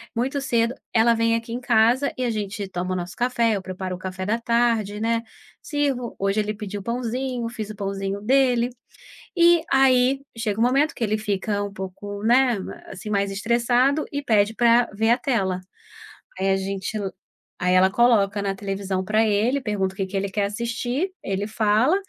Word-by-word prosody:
Muito 260 +4 -1
cedo, 235 -3 +1 0.2
ela 230 +1 +5
vem 230 0 +2
aqui 230 0 -4
em 240 - -2
casa 245 +3 +3
e 255 - -1
a 245 - 0
gente 205 -2 -3
toma 185 0 -3
o - - -1
nosso 180 0 -5
café, 235 -2 +1
eu 195 - -3
preparo 185 0 -5
o - - -11
café 185 0 -5
da 220 +4 0
tarde, 230 -3 +1
né, 230 +1 0 0.4
sirvo 275 -5 -2
hoje 195 +2 +1
ele 210 0 -1
pediu 205 -1 -6
o - - -13
pãozinho, 245 +1 -2
fiz 220 -3 -6
o - - -9
pãozinho 195 0 -3
dele. 250 0 +3 0.7
E 340 -1 +5
aí, 270 0 +4 0.2
chega 220 -2 -2
o - - +4
momento 275 +6 +2
que - - -3
ele 215 -1 +1
fica 205 -1 -2
um 200 - -5
pouco, 200 +1 -7
né, 245 +1 +4 0.3
assim, 195 +2 -8
mais 200 -1 0
estressado 240 +7 +2
e 285 - -2
pede 215 -4 +2
pra 235 +1 +4
ver 225 +2 +2
a 240 - +4
tela. 195 -9 -1 0.8
Aí 195 +1 +1
a 195 - +3
gente 195 +2 -3
la 195 -2 -3 0.5
aí 180 0 +3
ela 190 +1 +5
coloca 210 -3 +3
na 195 -1 -2
televisão 195 -1 -3
pra 215 +2 +2
ele, 225 +7 +1
pergunta 200 -5 -1
o - - -20
que 195 - -1
que 190 +1 -4
ele 195 +1 -1
quer 205 0 0
assistir, 240 - -2
ele 195 +1 -2
fala, 220 - +2
220 Hz, 195 wpm, -23 LUFS, 200-245 Hz, 0.8 s, ela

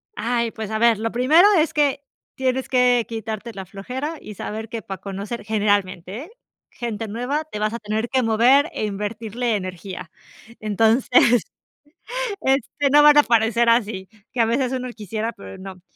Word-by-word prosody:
Ay, 235 +1 -1
pues, 220 -3 -6
a 220 - -1
ver, 230 -2 +4
lo 225 0 -2
primero 300 - +5
es 320 +1 +2
que 285 -2 +1 0.3
tienes 260 0 -1
que 250 -2 +3
quitarte 225 0 -5
la 190 -2 -7
flojera 255 - -5
y 210 - -9
saber 220 +3 -6
que 230 -1 -5
para 190 -1 -7
conocer, 200 +4 -6
generalmente, 205 - -1 0.4
gente 225 -2 -5
nueva, 250 +8 -2
te 210 - -5
vas 215 +1 0
a 235 - -4
tener 220 +2 -2
que 260 -1 +1
mover 245 +7 +4
e 215 - -2
invertirle 220 +3 -3
energía, 185 -2 -6 0.5
entonces, 225 +3 +3 1.0
este, 270 +2 +1
no 295 +1 +7
van 295 0 +7
a - - +10
aparecer 230 -1 +2
así 210 -5 +1 0.2
que 250 - -6
a - - +4
veces 245 +3 0
uno 255 -1 -3
quisiera, 220 +1 -4
pero 95 - -11
no. 190 -1 -10
225 Hz, 165 wpm, -22 LUFS, 210-250 Hz, 1.0 s, a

